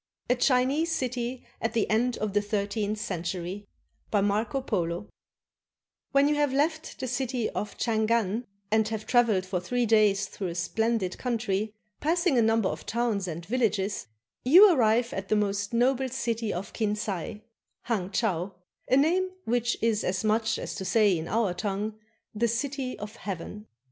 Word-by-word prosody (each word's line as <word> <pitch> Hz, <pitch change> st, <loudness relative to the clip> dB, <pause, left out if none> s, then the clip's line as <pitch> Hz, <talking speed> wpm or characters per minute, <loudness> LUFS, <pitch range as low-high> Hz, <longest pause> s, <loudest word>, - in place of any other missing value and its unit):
A -, -, +5 dB
CHINESE 265 Hz, +6 st, +2 dB
CITY 255 Hz, -3 st, -2 dB, 0.2 s
AT 225 Hz, -, -1 dB
THE 225 Hz, -, +1 dB
END 235 Hz, +3 st, +1 dB
OF 215 Hz, -2 st, -2 dB
THE 205 Hz, -, +3 dB
THIRTEENTH 205 Hz, 0 st, -1 dB
CENTURY 185 Hz, 0 st, -4 dB, 0.4 s
BY 205 Hz, -, +2 dB
MARCO 210 Hz, +6 st, 0 dB
POLO 180 Hz, -5 st, -2 dB, 1.0 s
When 275 Hz, 0 st, +4 dB
you 300 Hz, -, +3 dB
have 290 Hz, -2 st, +2 dB
left 310 Hz, +4 st, -1 dB
the 260 Hz, -, -3 dB
city 250 Hz, -1 st, -1 dB
of 210 Hz, -, -4 dB
Changan 225 Hz, 0 st, +1 dB, 0.3 s
and 220 Hz, 0 st, +3 dB
have 220 Hz, -1 st, -4 dB
traveled 225 Hz, -7 st, +3 dB
for 185 Hz, -1 st, -2 dB
three 245 Hz, +7 st, 0 dB
days 215 Hz, -3 st, +4 dB
through 195 Hz, -, -5 dB
a 170 Hz, -, -5 dB
splendid 200 Hz, +2 st, -1 dB
country, 220 Hz, -3 st, -1 dB, 0.2 s
passing 335 Hz, 0 st, +2 dB
a 240 Hz, -, +5 dB
number 225 Hz, -2 st, +3 dB
of 155 Hz, -2 st, -5 dB
towns 225 Hz, -4 st, 0 dB
and 170 Hz, 0 st, -5 dB
villages, 205 Hz, -, 0 dB, 0.4 s
you 360 Hz, +9 st, +8 dB
arrive 235 Hz, -2 st, +2 dB
at 195 Hz, 0 st, -5 dB
the -, -, +3 dB
most 200 Hz, -1 st, 0 dB
noble 260 Hz, +2 st, +2 dB
city 230 Hz, -3 st, -2 dB
of 190 Hz, +3 st, -5 dB
Kinsay 210 Hz, -1 st, -2 dB, 0.4 s
[Hang 200 Hz, -6 st, -1 dB
chau], 195 Hz, -4 st, -1 dB, 0.3 s
a 260 Hz, -, +5 dB
name 355 Hz, +6 st, +3 dB, 0.2 s
which 240 Hz, 0 st, +1 dB
is 225 Hz, -2 st, +2 dB
as 185 Hz, +2 st, -1 dB
much 220 Hz, +1 st, +1 dB
as -, -, -5 dB
to 195 Hz, -, -5 dB
say 205 Hz, +1 st, +3 dB
in 160 Hz, 0 st, -4 dB
our 215 Hz, -3 st, +1 dB
tongue, 205 Hz, +2 st, -2 dB, 0.4 s
"The 230 Hz, +2 st, +1 dB
City 260 Hz, +2 st, -2 dB
of 210 Hz, +2 st, -8 dB
Heaven." 205 Hz, +2 st, -6 dB
220 Hz, 165 wpm, -28 LUFS, 200-245 Hz, 1.0 s, you